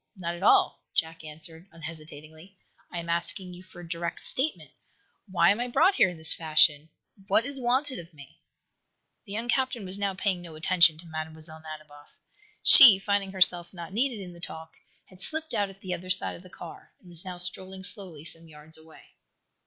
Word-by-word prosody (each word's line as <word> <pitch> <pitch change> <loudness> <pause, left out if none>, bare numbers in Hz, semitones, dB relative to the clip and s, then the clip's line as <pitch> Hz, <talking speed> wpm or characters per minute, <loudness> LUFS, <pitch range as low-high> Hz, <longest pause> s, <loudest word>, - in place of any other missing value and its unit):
"Not 170 -3 -5
at 175 - -10
all," 200 - +2
Jack 165 0 -3
answered, 160 +3 -6
unhesitatingly. 160 +2 -12 0.3
"I 175 - -7
am 170 0 -6
asking 170 +2 -3
you 175 - -12
for 185 -1 -15
a 175 - -12
direct 170 0 -6
statement. 285 +4 -3 0.6
Why 175 -1 +3
am 205 - -2
I 245 - -3
brought 305 +10 +2
here 190 - +3
in 175 - -10
this 160 0 +8
fashion? 155 -1 +2 0.4
What 225 - +1
is 275 -1 -5
wanted 260 +3 0
of 170 0 -13
me?" 145 -4 -17 0.9
The 200 - -9
young 230 +3 -5
captain 255 -4 -2
was 190 +2 -2
now 200 -1 -2
paying 190 -2 -2
no 170 -2 -12
attention 165 0 +3
to 170 - -14
Mlle. 155 -1 -6
Nadiboff. 155 -2 -8 0.5
She, 240 -8 +9
finding 195 0 -2
herself 180 -2 +2
not 170 +1 -10
needed 240 -1 -2
in 180 -1 -11
the 170 - -15
talk, 160 -1 -9 0.3
had 185 0 -18
slipped 315 +7 -4
out 205 -1 -1
at 195 +1 -17
the 185 -1 -5
other 180 +1 -8
side 185 0 +3
of - - -14
the 185 - -16
car, 175 -1 -13
and 185 - -22
was 170 -1 -1
now 185 -1 -8
strolling 185 +1 -5
slowly 185 -7 +5
some 165 0 -6
yards 155 +1 -9
away. 160 0 -18
175 Hz, 195 wpm, -26 LUFS, 160-195 Hz, 0.9 s, She